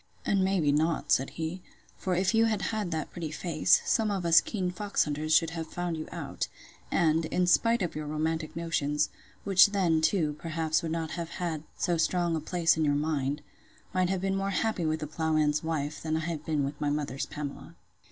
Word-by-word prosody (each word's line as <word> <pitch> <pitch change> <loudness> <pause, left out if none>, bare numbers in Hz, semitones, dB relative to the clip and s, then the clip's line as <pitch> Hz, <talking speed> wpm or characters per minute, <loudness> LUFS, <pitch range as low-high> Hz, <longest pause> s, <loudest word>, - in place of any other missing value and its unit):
And 195 -1 +2
may 190 0 +2
be 145 -3 +3
not, 155 +2 0
said 135 - +3
he; 165 +3 -3 0.3
for 185 -1 -2
if 190 +4 +1
you 225 0 +5
had 215 -3 0
had 210 -4 -1
that 160 -3 -3
pretty 165 -3 -5
face, 165 +1 +2
some 220 -1 +2
of 195 -4 -2
us 165 -1 +7
keen 185 -5 -2
fox 205 +2 0
hunters 150 +1 -3
should 165 +1 +4
have 165 -1 -5
found 175 0 -3
you 155 -1 -5
out; - - -4 0.4
and, 160 -1 +2
in 180 +3 +1
spite 230 +5 +3
of 175 - -3
your 155 -1 -4
romantic 155 +1 -2
notions, 150 -3 0 0.3
(which 195 -1 +7
then, 180 -6 +1
too, 160 -3 +2
perhaps, 160 -1 0
would 165 - -3
not 160 -1 -2
have 170 -2 -4
had 170 -4 -3 0.2
so 175 -1 +1
strong 170 0 +1
a - - 0
place 165 +1 +2
in 160 - +1
your 145 -1 +2
mind,) 145 -1 -1 0.5
might 185 -1 +2
have 190 -1 -1
been 195 0 0
more 195 0 -1
happy 195 -4 0
with 155 0 -1
the - - -2
ploughman's 155 -1 +1
wife, 150 -2 -2
than 160 0 -1
I - - -1
have 160 -2 -4
been 150 -3 +1
with 145 +2 -4
my 145 - +1
mother's 145 -2 -2
Pamela. 145 -1 -7
165 Hz, 210 wpm, -29 LUFS, 155-180 Hz, 0.5 s, us